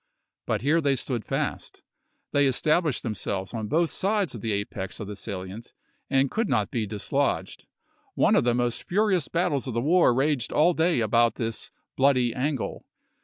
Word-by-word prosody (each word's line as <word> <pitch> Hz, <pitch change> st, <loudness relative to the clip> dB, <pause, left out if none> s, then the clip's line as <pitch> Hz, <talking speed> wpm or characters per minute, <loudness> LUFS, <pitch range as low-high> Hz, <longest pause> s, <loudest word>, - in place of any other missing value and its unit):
But 110 Hz, -2 st, 0 dB
here 155 Hz, +4 st, +3 dB
they 140 Hz, -2 st, +2 dB
stood 125 Hz, -3 st, -3 dB
fast. -, -, -4 dB, 0.5 s
They 145 Hz, -1 st, +3 dB
established 150 Hz, +2 st, +1 dB
themselves 100 Hz, -3 st, -3 dB
on 110 Hz, -2 st, -3 dB
both 165 Hz, +6 st, +1 dB
sides 200 Hz, -6 st, 0 dB
of 115 Hz, -, -7 dB
the 110 Hz, -, -2 dB
apex 100 Hz, -1 st, -4 dB
of 105 Hz, -, -4 dB
the 105 Hz, -, -6 dB
salient, 100 Hz, +2 st, -7 dB, 0.4 s
and 135 Hz, -1 st, +2 dB
could 225 Hz, -1 st, -1 dB
not 105 Hz, -5 st, +1 dB
be 110 Hz, -3 st, -1 dB
dislodged. 105 Hz, -1 st, -2 dB, 0.5 s
One -, -, +4 dB
of -, -, +4 dB
the 120 Hz, 0 st, +2 dB
most 120 Hz, -1 st, -1 dB
furious 190 Hz, -5 st, +1 dB
battles 150 Hz, -6 st, 0 dB
of 125 Hz, -, -4 dB
the -, -, +2 dB
war 170 Hz, +2 st, +4 dB
raged 135 Hz, 0 st, 0 dB
all 170 Hz, +4 st, +4 dB
day 165 Hz, -5 st, +2 dB
about 115 Hz, +1 st, +3 dB
this 115 Hz, -2 st, -3 dB, 0.3 s
"bloody 130 Hz, -3 st, +3 dB
angle." 135 Hz, 0 st, -3 dB
125 Hz, 170 wpm, -26 LUFS, 110-155 Hz, 0.5 s, One